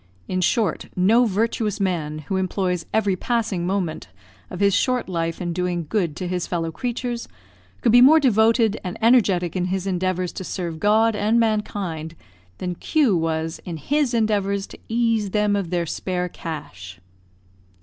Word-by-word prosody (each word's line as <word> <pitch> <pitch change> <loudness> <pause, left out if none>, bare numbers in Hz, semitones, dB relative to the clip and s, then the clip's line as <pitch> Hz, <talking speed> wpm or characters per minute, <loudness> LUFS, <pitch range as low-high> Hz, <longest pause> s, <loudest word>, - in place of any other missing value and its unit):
In 185 0 -1
short, 190 0 0
no 220 +7 +4
virtuous 215 0 -1
man, 155 -6 -2
who 190 - -1
employs 185 -1 -1
every 205 -3 +1
passing 205 -4 -1
moment 185 -4 -2 0.4
of 180 - -7
his 200 -1 +3
short 250 +3 +1
life 165 -2 -2
in 175 -2 -3
doing 175 -1 -2
good 175 -7 -1
to 180 +1 -4
his 180 -1 -2
fellow 165 -2 -2
creatures, 240 +5 -4 0.5
could 230 - +3
be 245 +2 +7
more 300 +5 +8
devoted 225 -3 +3
and 180 -1 -5
energetic 200 -8 +3
in 180 -1 0
his 185 0 -2
endeavours 185 -1 -1
to - - -6
serve 170 -3 -4
God 220 +3 +3
and 215 +3 +2
mankind, 200 -8 -2 0.4
than 180 -1 -3
Q 265 - +2
was 160 0 -2
in 170 -3 -5
his 275 - 0
endeavours 200 -3 +1
to - - -13
ease 225 -3 +1
them 210 0 +1
of 195 -4 -2
their 175 -1 0
spare 180 +2 -2
cash. 90 - -8
190 Hz, 160 wpm, -22 LUFS, 175-220 Hz, 0.5 s, more